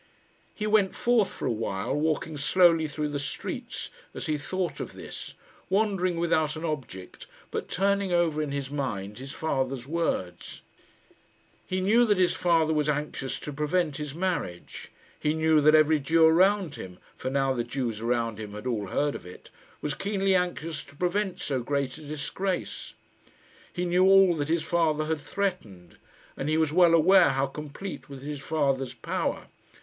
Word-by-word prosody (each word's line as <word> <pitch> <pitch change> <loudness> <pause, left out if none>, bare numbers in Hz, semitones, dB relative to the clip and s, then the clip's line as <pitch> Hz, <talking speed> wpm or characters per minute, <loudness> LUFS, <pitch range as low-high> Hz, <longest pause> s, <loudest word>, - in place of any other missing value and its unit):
He 210 - -3
went 210 -3 +3
forth 235 -4 +2
for - - -6
a - - +1
while, 105 -4 -2
walking 155 +1 -1
slowly 165 +2 +4
through 150 0 -3
the 145 -1 -3
streets, 140 0 -5 0.2
as - - -5
he 155 - 0
thought 180 +5 -3
of - - -5
this, - - -8 0.3
wandering 190 -3 +1
without 160 -3 +1
an 160 +2 -5
object, 130 - -6 0.2
but - - -4
turning 200 +1 +1
over 170 -3 +2
in 150 -2 -3
his 140 -1 -4
mind 105 -7 -3
his 135 +1 -7
father's 135 -5 -2
words. 150 - -3 1.0
He 185 0 -1
knew 220 +6 +4
that 205 -3 +2
his 180 -1 +3
father 165 -3 +2
was 150 -1 +1
anxious 145 -2 -2
to 150 - -6
prevent 150 +1 0
his 150 -2 -5
marriage. 170 - -3 0.3
He 150 +1 0
knew 160 -1 +3
that 155 +1 +6
every 155 0 +5
Jew 160 +4 +4
around 185 0 +3
him 90 -1 -8 0.2
for 130 - -4
now 135 0 +1
the 120 -2 -1
Jews 120 -3 -3
around 115 -2 -1
him 105 -2 -7
had 105 +3 -8
all 110 -5 -1
heard 145 +9 0
of - - -8
it 90 - -13 0.3
was 150 - -1
keenly 195 +2 0
anxious 175 -4 -1
to 140 - -17
prevent 180 +4 -1
so 135 -3 -1
great 140 +2 -2
a - - -12
disgrace. 155 +6 -4 0.8
He 180 - -2
knew 180 +1 +3
all 195 -2 +6
that 145 0 -2
his 165 -1 +1
father 160 -2 +1
had 160 0 -1
threatened, 130 - -4 0.4
and 140 - -3
he 155 - +2
was 160 -2 +1
well 175 -1 +6
aware 180 +2 +6
how 135 0 +1
complete 150 +7 -7
was 135 -1 -9
his 145 0 -5
father's 135 -3 -1
power. 115 - -2
155 Hz, 175 wpm, -27 LUFS, 135-180 Hz, 1.0 s, that